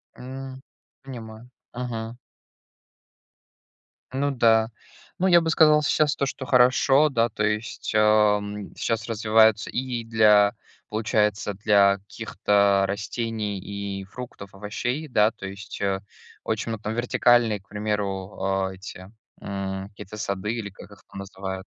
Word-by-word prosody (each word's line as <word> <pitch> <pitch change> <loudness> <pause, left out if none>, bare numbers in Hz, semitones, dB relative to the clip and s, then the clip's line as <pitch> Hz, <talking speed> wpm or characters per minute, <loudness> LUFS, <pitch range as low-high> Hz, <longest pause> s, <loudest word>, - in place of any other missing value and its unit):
М. 130 +1 -8 0.4
Понимаю. 115 -3 -10 0.2
Мгм. 120 -1 -5 2.0
Ну 140 +2 0
да. 115 -3 +3 0.5
Ну, 190 - +1
я 175 -2 +6
бы 165 - -1
сказал 155 -2 +5
сейчас 150 0 +2
то, 140 - 0
что 135 0 -5
хорошо, 130 +4 +4
да, 115 -4 +1
то 105 - -3
есть, 105 +2 -3
ам, 105 -1 +2
щас 110 -2 -2
развивается 110 -1 +3
и 125 -2 -3
для, 105 -2 +4 0.4
получается, 105 -1 0
для 100 -1 +3
каких-то 100 0 +1
растений 105 +1 -3
и 100 0 -5
фруктов, 100 -2 -10
овощей, 120 +9 -4
да. 110 -5 +3
То 100 - -10
есть, 100 +1 -9
э, 95 -1 0 0.4
очень 110 +1 -2
много 110 -1 -5
там- 110 - -2
вертикальные, 120 -3 +3
к - - -33
примеру, 105 -2 -3
а, 95 0 0
эти, 95 0 -10 0.3
м, 95 -1 -4
какие-то 100 0 -10
сады 105 +1 -2
или 115 -4 -4
как 100 +1 -14
их 100 - -15
там - - -9
называют. 95 -1 -6
105 Hz, 130 wpm, -25 LUFS, 100-120 Hz, 2.0 s, я